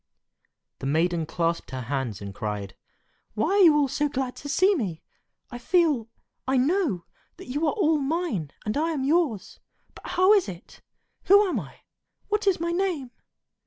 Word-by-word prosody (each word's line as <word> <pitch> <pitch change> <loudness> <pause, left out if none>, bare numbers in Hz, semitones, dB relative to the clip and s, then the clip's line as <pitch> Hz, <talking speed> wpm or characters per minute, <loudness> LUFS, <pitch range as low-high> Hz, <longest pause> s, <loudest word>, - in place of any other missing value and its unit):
The 135 - -4
maiden 165 +2 +1
clasped 170 0 -1
her 130 -1 -5
hands 125 -5 -3
and 100 -1 -7
cried, 105 -2 -5 0.6
"Why 220 +9 0
are 405 - +3
you 320 -5 +7
all 290 -2 +3
so 295 +2 -1
glad 260 -2 -3
to 285 - -8
see 375 +8 +4
me? 195 - -3 0.5
I 245 - -7
feel—I 265 -4 0
know—that 275 - -2
you 295 +5 0
are - - +1
all 320 -7 +2
mine, 280 - -2 0.2
and 210 - -2
I 325 +2 0
am 275 -4 -2
yours; 290 - 0 0.3
but - - -12
how 370 +3 +4
is 400 - +3
it? 175 -1 -11 0.4
Who 405 +1 +6
am 315 - -1
I? 140 -8 -11 0.5
What 420 0 0
is 380 -4 +3
my 340 +1 -1
name?" 345 -8 -1
275 Hz, 165 wpm, -25 LUFS, -, 0.6 s, you